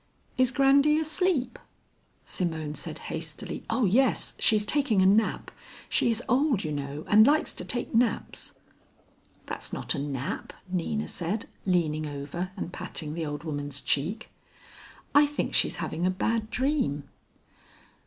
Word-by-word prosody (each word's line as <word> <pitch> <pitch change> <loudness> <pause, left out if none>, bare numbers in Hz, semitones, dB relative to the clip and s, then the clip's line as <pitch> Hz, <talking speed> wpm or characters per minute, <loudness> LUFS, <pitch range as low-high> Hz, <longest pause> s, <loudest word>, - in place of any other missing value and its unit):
"Is 255 -1 +4
Grandy 280 +3 +4
asleep?" 315 -5 +1 0.7
Simone 160 -4 -2
said 150 - -5 0.2
hastily, - - -6
"Oh 250 - +2
yes, 240 +6 +2
she's 210 -1 +3
taking 260 -4 +2
a 190 - +5
nap. 210 +4 +2 0.4
She - - +2
is 225 - 0
old, 255 -3 +2
you 155 - -3
know, 145 +1 -4
and 215 +1 +7
likes 305 +2 +3
to - - -6
take 240 - -3
naps." 230 0 0 0.9
"That's - - -5
not - - -1
a 150 - -3
nap," 140 - -4
Nina 185 +4 -2
said, 185 +5 -3 0.2
leaning 155 -4 +1
over 145 +5 -4
and 180 -2 -5
patting 160 -4 -4
the 160 -1 -3
old 145 +1 -5
woman's 145 -3 -4
cheek, 160 - -1 0.8
"I 290 +1 +7
think 295 - -3
she's - - +2
having 170 +3 -2
a - - +3
bad 220 +4 0
dream." 255 - 0
190 Hz, 145 wpm, -28 LUFS, 155-250 Hz, 0.9 s, and